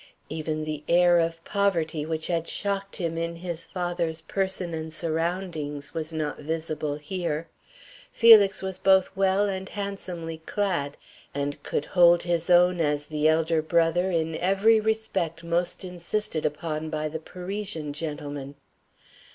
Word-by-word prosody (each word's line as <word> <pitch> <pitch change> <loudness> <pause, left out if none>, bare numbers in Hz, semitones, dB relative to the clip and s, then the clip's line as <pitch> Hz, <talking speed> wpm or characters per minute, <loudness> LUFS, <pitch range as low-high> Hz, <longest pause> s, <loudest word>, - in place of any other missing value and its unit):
Even 155 0 -3
the 155 -1 -4
air 175 0 +5
of 165 0 -1
poverty 165 -6 0
which 160 -1 -2
had 170 -1 -1
shocked 195 -1 -2
him 165 -3 -2
in 170 0 -2
his 170 -1 -5
father's 175 -3 -2
person 190 -2 -2
and 160 0 -4
surroundings 160 -3 -2
was 160 0 -2
not 155 -2 -3
visible 155 -1 -3
here. 165 0 -3 0.6
Felix 210 -4 +7
was 190 -1 -3
both 190 -1 +4
well 195 +1 +3
and 190 -1 -4
handsomely 180 -5 -5
clad, 165 -5 -2 0.4
and 145 0 -3
could 145 - -2
hold 175 -1 +5
his 170 0 -1
own 180 0 +5
as 145 -1 0
the 155 0 +1
elder 160 0 +2
brother 170 +3 +2
in 165 -2 0
every 195 +4 +4
respect 195 -7 -1
most 170 +3 -1
insisted 180 -2 -1
upon 155 +1 -4
by 155 -1 -2
the 160 +1 -5
Parisian 180 -3 -4
gentleman. 145 -2 -5
170 Hz, 140 wpm, -26 LUFS, 155-185 Hz, 0.6 s, Felix